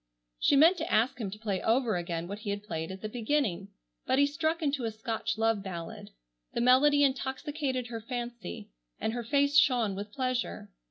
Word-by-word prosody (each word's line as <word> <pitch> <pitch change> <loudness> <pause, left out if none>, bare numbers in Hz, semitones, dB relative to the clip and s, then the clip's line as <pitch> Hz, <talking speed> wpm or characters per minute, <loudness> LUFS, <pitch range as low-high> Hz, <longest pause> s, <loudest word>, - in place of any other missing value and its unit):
She - - +4
meant 325 +6 +6
to 320 0 -4
ask 235 +3 +2
him 205 - -2
to 200 - -8
play 205 -4 -2
over 230 -2 +2
again 170 -1 -3
what 200 +2 -6
he 205 -2 -2
played 165 -5 -5
at 190 - -8
the - - -1
beginning, 220 -5 -1 0.4
but 260 - +2
he 285 - +6
struck 315 +3 -1
into 280 -3 0
a - - 0
Scotch 220 0 -3
love 225 -2 +2
ballad. 170 -4 -7 0.5
The - - 0
melody 285 +4 +5
intoxicated 265 0 -1
her 230 -2 -6
fancy, 240 - -6 0.3
and 220 - -1
her 240 0 -3
face 285 +3 +4
shone 240 -8 +3
with 205 +2 -6
pleasure. 255 +1 -2
235 Hz, 185 wpm, -30 LUFS, 210-275 Hz, 0.5 s, meant